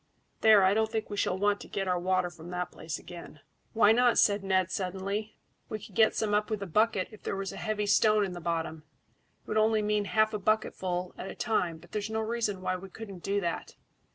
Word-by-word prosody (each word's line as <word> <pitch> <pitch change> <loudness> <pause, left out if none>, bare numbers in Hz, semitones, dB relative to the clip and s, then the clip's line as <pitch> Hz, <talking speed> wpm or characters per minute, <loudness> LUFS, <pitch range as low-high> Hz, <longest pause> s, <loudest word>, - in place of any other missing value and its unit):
There, 215 -3 +7
I 190 +1 +5
don't 220 +1 +1
think 220 -2 -3
we 205 - -4
shall 185 - +1
want 205 +1 +1
to - - -9
get 195 -1 -3
our 180 -1 +1
water 185 0 +1
from 165 0 -11
that 180 0 -3
place 160 -1 -5
again." 170 -4 -11 0.3
"Why 220 -2 +5
not?" 240 +1 +4
said 205 -1 +4
Ned 185 -2 +1
suddenly. 195 +3 -3 0.3
"We 215 - -3
could 205 -1 -13
get 220 +3 +4
some 210 -1 0
up 210 0 +1
with 215 -2 -2
a - - -4
bucket 210 +2 +1
if 215 - -13
there - - -3
was 195 0 -4
a - - -8
heavy 215 -1 -2
stone 215 0 +4
in 185 - -5
the 175 - -7
bottom. 165 -1 -2 0.6
It - - -34
would 215 - -1
only 215 0 +3
mean 210 0 +1
half 215 +1 +2
a 210 - -2
bucketful 185 -4 -1
at 190 - -5
a - - -7
time, 180 -8 0
but 160 - -18
there's 210 0 -3
no 220 0 -1
reason 220 -3 -2
why 185 0 -1
we 190 +1 -10
couldn't 200 -2 -9
do 200 +3 0
that." 170 -2 -4
200 Hz, 235 wpm, -29 LUFS, 185-215 Hz, 0.6 s, There